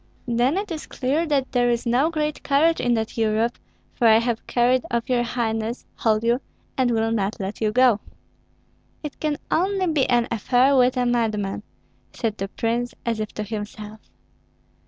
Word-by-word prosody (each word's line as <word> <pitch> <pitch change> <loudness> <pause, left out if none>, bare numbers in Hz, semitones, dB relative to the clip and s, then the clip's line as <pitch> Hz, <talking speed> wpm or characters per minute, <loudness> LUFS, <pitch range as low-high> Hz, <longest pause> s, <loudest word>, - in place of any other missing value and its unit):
"Then 245 +7 +2
it 405 -1 -3
is 315 -2 -5
clear 285 +6 -1
that 275 -3 0
there 245 -1 +2
is 235 0 0
no 250 +6 +2
great 305 -2 -2
courage 310 +4 +2
in 245 -1 +2
that 225 +1 -3
Europe, 225 +2 +1 0.3
for 235 - +2
I 220 0 +7
have 230 0 -1
carried 250 +1 +2
off 235 +1 -1
your 250 -2 +2
highness, 230 -1 -2
hold 220 -1 +1
you, 235 +3 +2 0.3
and 255 -2 +2
will 225 -1 +1
not 210 -2 -1
let 195 +3 -5
you 215 -1 +2
go." 245 -2 +4 1.0
"It 300 - -7
can 300 -2 -1
only 380 +3 +1
be 310 -6 +1
an 240 -1 +3
affair 250 +5 +3
with 255 0 +4
a 250 - +2
madman," 215 -5 0 0.5
said 220 -3 -3
the 195 - -2
prince, 235 +4 -2
as 230 -2 -1
if 215 -1 -3
to 215 - -3
himself. 210 0 -7
240 Hz, 180 wpm, -23 LUFS, 220-260 Hz, 1.0 s, I